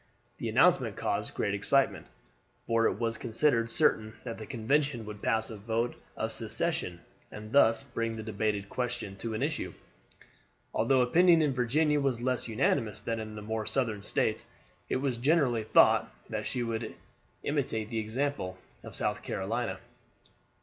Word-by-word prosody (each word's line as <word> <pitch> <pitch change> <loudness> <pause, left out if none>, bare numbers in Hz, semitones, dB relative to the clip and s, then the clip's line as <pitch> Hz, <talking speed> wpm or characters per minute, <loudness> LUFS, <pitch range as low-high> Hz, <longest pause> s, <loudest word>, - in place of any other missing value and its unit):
The - - -2
announcement - - +4
caused - - -2
great 100 - 0
excitement, 130 +7 +2 0.6
for 115 0 +3
it - - +1
was 115 0 -2
considered 115 0 +1
certain 110 -6 +2
that 115 -3 -6
the 110 - -7
convention 130 0 0
would 105 -1 -8
pass 110 0 +1
a 110 - -6
vote 115 +3 -1 0.2
of - - -2
secession, 85 -1 -2 0.3
and 110 0 -9
thus 115 -5 +5
bring 115 -1 -3
the 110 - -6
debated 105 -2 -1
question 120 -4 -3
to 110 +2 -4
an 110 - -1
issue. 145 - -2 1.0
Although 130 +3 +3
opinion 165 +6 +5
in 145 -3 +1
Virginia 145 +5 +2
was 135 -4 0
less 125 0 0
unanimous 115 -1 +1
than 115 -1 -3
in 110 -1 -6
the 105 - -7
more 110 0 -3
southern 115 -6 0
States, - - 0 0.4
it - - +1
was 130 -2 0
generally 130 -5 +2
thought - - +5 0.2
that - - -2
she 125 - -2
would 115 -1 -3 0.5
imitate 125 -7 -1
the 115 - -1
example 110 -4 -2 0.3
of - - -8
South - - -1
Carolina. 110 +5 -2
115 Hz, 155 wpm, -30 LUFS, 110-130 Hz, 1.0 s, thus